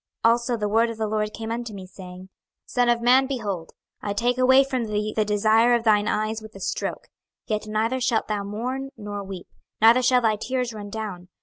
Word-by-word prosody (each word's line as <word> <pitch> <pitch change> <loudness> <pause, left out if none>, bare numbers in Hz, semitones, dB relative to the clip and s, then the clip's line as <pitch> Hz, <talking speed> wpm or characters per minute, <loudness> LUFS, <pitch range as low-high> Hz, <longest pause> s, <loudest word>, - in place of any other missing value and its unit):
26:024:015 230 - +7
Also 240 +1 0
the 210 -1 -1
word 225 +2 +3
of 230 - -6
the 220 - -1
LORD 210 0 -1
came 225 0 -6
unto 235 -1 -4
me, 190 -1 -8
saying, 185 -1 -11
26:024:016 190 - -14 0.4
Son 245 -1 +2
of 235 0 +2
man, 260 +2 +5
behold, 205 -11 -4 0.3
I 205 - -2
take 240 +4 0
away 260 +1 +6
from 260 -3 -2
thee 210 0 -2
the 215 - +2
desire 220 +3 +4
of 235 - -1
thine 210 -2 +3
eyes 215 +1 -1
with 220 -1 -12
a - - -9
stroke: 185 - -3 0.4
yet 215 -1 -2
neither 225 +4 -1
shalt 240 -3 +1
thou 210 -2 -2
mourn 250 +7 -4
nor 205 -2 -6
weep, 190 -2 -8 0.3
neither 230 +3 +6
shall 250 0 +4
thy 220 -2 +2
tears 250 +1 -2
run 205 -1 -7
down. 200 -5 -6
220 Hz, 220 wpm, -24 LUFS, 210-240 Hz, 0.4 s, 26:024:015